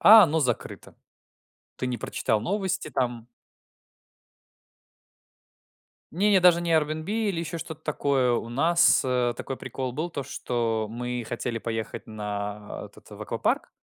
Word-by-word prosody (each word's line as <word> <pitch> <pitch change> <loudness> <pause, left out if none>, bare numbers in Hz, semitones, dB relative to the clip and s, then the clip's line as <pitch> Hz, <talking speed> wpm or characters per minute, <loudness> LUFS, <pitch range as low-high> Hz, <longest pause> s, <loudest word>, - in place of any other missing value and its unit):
а 220 +1 +10
оно 160 -2 +3
закрыто. 125 -4 -3 0.8
Ты 125 - -3
не 125 -1 -2
прочитал 105 0 -1
новости 190 - -1
там 120 -3 -2 2.9
Не-не, 200 +1 +4
даже 175 -1 +6
не 170 - -2
Airbnb 155 +1 +1
или 210 -5 0
еще 170 0 -4
что-то 160 -1 -7
такое. 140 -4 +1
У 115 - -1
нас, 165 +8 +4
э, 125 -2 +1
такой 135 - -5
прикол 130 0 -4
был, 155 +7 -3
то, 140 -4 -4
что 115 -4 -1
мы 125 +1 -3
хотели 120 0 -3
поехать 115 -1 -4
на, 105 -1 -5
а, - - -7
этот - - -16
в - - -9
аквапарк. - - -1
130 Hz, 140 wpm, -26 LUFS, 120-165 Hz, 2.9 s, а